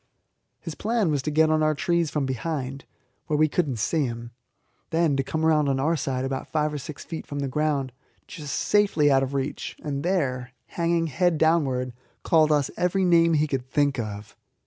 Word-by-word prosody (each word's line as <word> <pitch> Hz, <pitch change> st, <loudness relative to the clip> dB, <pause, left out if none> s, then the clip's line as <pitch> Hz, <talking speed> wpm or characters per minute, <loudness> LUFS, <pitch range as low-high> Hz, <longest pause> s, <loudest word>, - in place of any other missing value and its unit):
His 165 Hz, -, -7 dB
plan 215 Hz, -4 st, 0 dB
was 145 Hz, -2 st, 0 dB
to 150 Hz, -, -3 dB
get 155 Hz, +1 st, +3 dB
on 155 Hz, 0 st, +2 dB
our 155 Hz, 0 st, +2 dB
trees 170 Hz, +2 st, +1 dB
from 145 Hz, -2 st, -1 dB
behind, 135 Hz, 0 st, -4 dB, 0.4 s
where 150 Hz, -, +1 dB
we 155 Hz, +1 st, +4 dB
could 160 Hz, +1 st, 0 dB
not 130 Hz, -4 st, -3 dB
see 145 Hz, +7 st, +1 dB
him, 120 Hz, 0 st, -7 dB, 0.6 s
then 165 Hz, -3 st, +2 dB
to 135 Hz, -, +1 dB
come 160 Hz, +4 st, -2 dB
round 150 Hz, -3 st, +3 dB
on 135 Hz, -1 st, 0 dB
our 160 Hz, +5 st, +1 dB
side 130 Hz, -3 st, -2 dB
about 135 Hz, 0 st, -3 dB
five 150 Hz, -1 st, 0 dB
or 150 Hz, -, -3 dB
six 140 Hz, +1 st, -8 dB
feet 165 Hz, -2 st, -7 dB
from 145 Hz, -, -6 dB
the 140 Hz, -1 st, -1 dB
ground, 140 Hz, -1 st, -1 dB, 0.3 s
just 150 Hz, -3 st, -6 dB
safely 200 Hz, -8 st, +3 dB
out 135 Hz, 0 st, +4 dB
of 135 Hz, +1 st, -2 dB
reach, 135 Hz, +1 st, -3 dB
and 140 Hz, -2 st, -3 dB
there, 130 Hz, -9 st, -1 dB, 0.2 s
hanging 170 Hz, -1 st, 0 dB
head 165 Hz, +2 st, +1 dB
downwards, 135 Hz, -6 st, +1 dB, 0.3 s
call 155 Hz, -2 st, +4 dB
us 145 Hz, -2 st, +2 dB
every 185 Hz, +2 st, +1 dB
name 170 Hz, -1 st, +4 dB
he 150 Hz, 0 st, +3 dB
could 130 Hz, -3 st, -3 dB
think 140 Hz, -2 st, +1 dB
of. 105 Hz, -2 st, -6 dB
150 Hz, 200 wpm, -25 LUFS, 135-165 Hz, 0.6 s, we